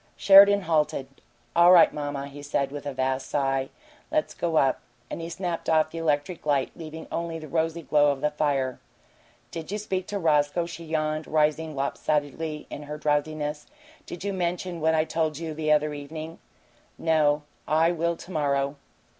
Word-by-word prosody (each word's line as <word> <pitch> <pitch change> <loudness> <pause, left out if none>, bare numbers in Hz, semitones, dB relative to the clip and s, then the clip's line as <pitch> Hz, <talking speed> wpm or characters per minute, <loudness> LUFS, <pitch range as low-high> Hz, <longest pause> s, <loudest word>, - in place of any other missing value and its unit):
Sheridan 200 +1 +8
halted. 155 -5 0 0.5
"All 170 +1 +7
right, 180 -2 +7
mamma," 145 -2 -4
he 140 +1 -10
said, 140 -1 -1
with 145 0 -6
a - - -2
vast 130 0 -2
sigh. 135 -2 0 0.4
"Let's 310 0 0
go 170 -2 -2
up." 135 -3 +3 0.3
And - - -4
he 165 - -5
snapped 175 -1 -3
off 155 -1 +3
the 165 - -5
electric 155 +2 -1
light, 140 -3 +1
leaving 160 -1 -8
only 170 -1 -3
the 155 -1 -9
rosy 165 +2 -1
glow 145 -1 +4
of 135 -1 -5
the 150 - +1
fire. 140 -4 -1 0.7
"Did 165 +1 -6
you 210 - -1
speak 190 -3 -3
to 205 - -3
Roscoe?" 155 -1 +2
she 170 0 -8
yawned, 155 -1 -2
rising 155 0 +1
lopsidedly 150 +2 -2
in - - -6
her 150 +1 -7
drowsiness. 150 0 -1 0.4
"Did 175 - -7
you 200 0 -2
mention 180 -1 -2
about - - -9
what 160 +1 +3
I 155 - +3
told 160 -2 -1
you 160 -1 -5
the 155 0 -1
other 150 0 +3
evening?" 155 +3 -7 0.6
"No. 150 -2 +2 0.2
I 160 +2 +3
will 170 0 -1
to 180 - -11
morrow." 140 -3 0
155 Hz, 180 wpm, -26 LUFS, 145-165 Hz, 0.7 s, Sheridan